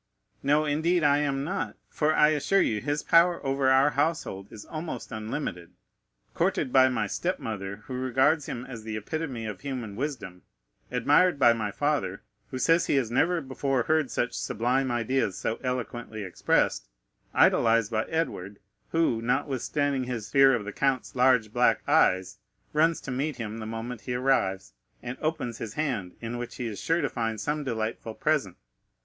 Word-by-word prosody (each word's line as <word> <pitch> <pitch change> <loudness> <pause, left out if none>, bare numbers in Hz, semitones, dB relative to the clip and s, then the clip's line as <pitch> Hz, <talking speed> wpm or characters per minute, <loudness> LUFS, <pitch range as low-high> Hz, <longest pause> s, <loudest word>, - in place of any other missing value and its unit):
"No, 145 +2 +2
indeed, 160 +4 +1
I 145 0 +4
am 140 -2 0
not; 190 +6 -3
for 155 0 0
I 150 - +6
assure 155 +6 +2
you, 105 -2 -1
his 145 +2 -2
power 170 +1 +4
over 135 0 +2
our 135 +2 +5
household 140 - -2
is 110 -2 -10
almost 155 -2 -6
unlimited. 110 - -5 0.6
Courted 130 - 0
by 130 0 +6
my 115 -4 0
step 180 - -2
mother, 100 -1 -6
who 130 - -7
regards 130 +4 +2
him 125 +1 -5
as 120 -4 -8
the 110 0 -5
epitome 130 0 -4
of 105 -3 -6
human 125 -7 -5
wisdom; 115 -9 -5 0.5
admired 145 +7 +3
by 120 -4 +6
my 110 -2 -2
father, 145 +8 -1 0.3
who 130 - -5
says 165 +6 +3
he - - +2
has 125 -5 +1
never 165 +7 +2
before 135 -1 -1
heard 155 0 +1
such 120 - -1
sublime 125 +4 0
ideas 120 -4 0
so 115 - -2
eloquently 120 -3 -4
expressed; 75 -9 0 0.5
idolized 115 -1 +4
by 110 0 0
Edward, 105 - -3 0.3
who, 165 -9 +1
notwithstanding 135 +2 0
his 115 -4 -5
fear 135 -1 +6
of 110 -4 -4
the 105 - -6
count's 135 -2 -1
large 125 -4 +3
black 125 0 +2
eyes, 95 0 +3 0.3
runs 160 +2 +2
to 135 - -6
meet 140 +3 -2
him 115 -2 -5
the 110 - -6
moment 115 +1 -5
he 125 - -4
arrives, 95 - 0 0.3
and 125 +1 -4
opens 155 -7 -2
his 110 -1 -6
hand, 125 -13 -2
in 120 +1 -4
which 120 - -6
he 125 - -4
is 110 -3 -5
sure 165 +1 +1
to - - +1
find 115 -3 -2
some 150 +6 -2
delightful 110 -2 -3
present,—M. 150 - 0
125 Hz, 170 wpm, -27 LUFS, 110-145 Hz, 0.6 s, I